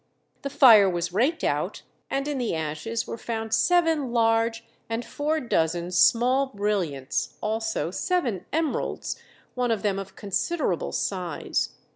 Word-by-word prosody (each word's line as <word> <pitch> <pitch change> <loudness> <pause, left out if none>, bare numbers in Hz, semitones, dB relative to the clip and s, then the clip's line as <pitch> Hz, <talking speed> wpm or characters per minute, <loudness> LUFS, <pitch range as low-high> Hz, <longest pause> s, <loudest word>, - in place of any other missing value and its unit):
The 280 - -3
fire 235 -8 +7
was 175 0 -2
raked 270 - +1
out, - - -1 0.3
and 275 +1 -1
in 290 -3 -2
the 240 -8 -1
ashes 160 +9 -3
were 230 - -6
found 225 -1 -4
seven 325 -3 +2
large 225 -1 +2 0.2
and 230 +1 -2
four 305 +2 -1
dozen 175 - 0
small 250 +8 +4
brilliants, 195 - -2
also 220 -4 -2
seven 240 - -1
emeralds, 320 -1 -2 0.3
one 250 -1 -1
of 225 -3 0
them 200 -2 0
of 195 -1 -8
considerable 205 - -1
size. 180 -5 -2
225 Hz, 135 wpm, -25 LUFS, 190-270 Hz, 0.3 s, fire